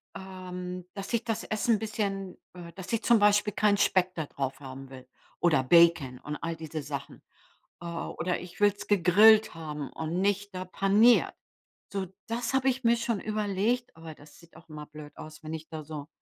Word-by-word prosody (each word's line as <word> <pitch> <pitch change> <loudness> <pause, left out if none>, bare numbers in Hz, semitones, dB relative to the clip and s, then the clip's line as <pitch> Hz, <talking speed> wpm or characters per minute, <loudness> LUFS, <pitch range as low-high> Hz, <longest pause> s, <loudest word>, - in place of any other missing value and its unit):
ähm, 180 -1 -7
dass 200 +3 -7
ich 235 - +1
das 225 -2 -2
Essen 220 +2 +1
'n - - -3
bisschen 200 -3 -3 0.2
äh, 175 -2 -10
dass 190 +4 -8
ich 225 - 0
zum 235 -2 +5
Beispiel 205 0 +3
keinen 205 -1 +3
Speck 185 -2 +2
da 160 -3 -3
drauf 135 -1 -4
haben 135 0 -9
will 130 -1 -12 0.3
oder 155 -7 +3
Bacon 165 -4 +4
und 150 +2 -6
all 165 0 -4
diese 160 -1 -6
Sachen. 140 -1 -7 0.6
Äh, 170 - -8
oder 170 +1 -3
ich 180 +2 -11
will's 205 0 +2
gegrillt 205 +2 +6
haben 150 -3 -6
und 160 +3 -3
nicht 200 0 0
da 185 0 -4
paniert. 205 +6 +4 0.6
So, 195 -2 -3 0.2
das 230 +1 -2
habe 265 0 +3
ich 260 0 -2
mir 235 +1 +5
schon 230 -3 -1
überlegt, 215 +4 -1
aber 160 -1 -9
das 145 - -17
sieht 170 -1 -20
auch - - -17
immer 150 -1 -8
blöd 150 -1 -12
aus, 155 +1 -11
wenn 155 +1 -6
ich 160 0 -7
da 155 -2 -7
so 150 -1 -7
185 Hz, 190 wpm, -28 LUFS, 155-210 Hz, 0.6 s, gegrillt